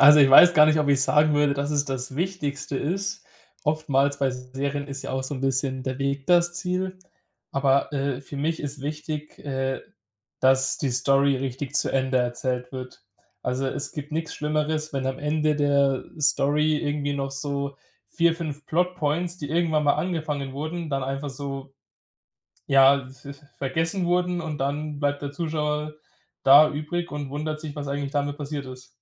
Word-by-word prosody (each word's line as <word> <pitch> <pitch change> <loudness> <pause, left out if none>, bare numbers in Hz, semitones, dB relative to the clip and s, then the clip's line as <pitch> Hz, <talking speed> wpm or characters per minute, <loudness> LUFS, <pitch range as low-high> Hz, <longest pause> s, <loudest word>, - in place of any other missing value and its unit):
Also, 145 +2 +9
ich 135 - +6
weiß 175 +6 +9
gar 150 0 +8
nicht, 155 0 +3
ob 150 -1 +1
ich 140 -1 +4
sagen 150 +2 +4
würde, 145 -1 +3
dass 140 +1 -2
es 145 -1 +1
das 130 -1 -4
Wichtigste 150 -6 -2
ist. 195 +7 -2 0.4
Oftmals 145 -2 +1
bei 135 -1 +2
Serien 135 +3 -4
ist 135 0 -6
ja - - -5
auch 130 0 -1
so 130 - -4
'n 130 - -6
bisschen 135 0 0
der 130 0 -4
Weg 140 0 -2
das 175 -1 +4
Ziel, 185 0 -2 0.5
aber, 135 +1 +2
äh, 140 -2 -1
für 140 +1 -9
mich 160 +4 -1
ist 145 -1 -5
wichtig, 150 +1 -5
äh, 135 -1 -2 0.6
dass 130 0 +3
die 140 - -1
Story 135 +2 +3
richtig 135 +2 -4
zu - - +2
Ende 130 -1 +1
erzählt 125 +1 -2
wird. 130 -1 -8 0.4
Also, 125 +2 -1
es 135 - -3
gibt 150 0 -7
nix 160 +1 -3
Schlimmeres, 155 +1 -1
wenn 135 -1 -2
am 130 0 -2
Ende 150 0 +1
der 140 -2 +2 0.2
Story 150 +2 +2
irgendwie 145 -1 -1
noch 135 -1 -2
so 140 0 -3 0.3
4, 170 -1 +2
5 150 -4 -6
Plot-points, 175 0 0
die 145 - -5
irgendwann 160 -2 +1
mal 145 - +4
angefangen 150 -5 -2
wurden, 155 +3 -4
dann 135 -1 -1
einfach 135 +2 -3
so, 135 0 -6 0.9
ja, 135 -1 +5
v 135 +2 -11
v 140 - -16 0.2
vergessen 160 +7 -1
wurden 180 0 +1
und 155 -2 -4
dann 145 +2 -2
bleibt 145 0 0
der 145 0 -4
Zuschauer 150 -1 -2 0.5
da 145 +3 +8
übrig 155 +3 -3
und 145 -2 -4
wundert 155 +1 -3
sich, 155 -3 -7
was 145 -1 -4
eigentlich 140 0 -3
damit 145 0 -1
passiert 145 -1 -5
ist. 130 0 -10
145 Hz, 180 wpm, -25 LUFS, 135-155 Hz, 0.9 s, Also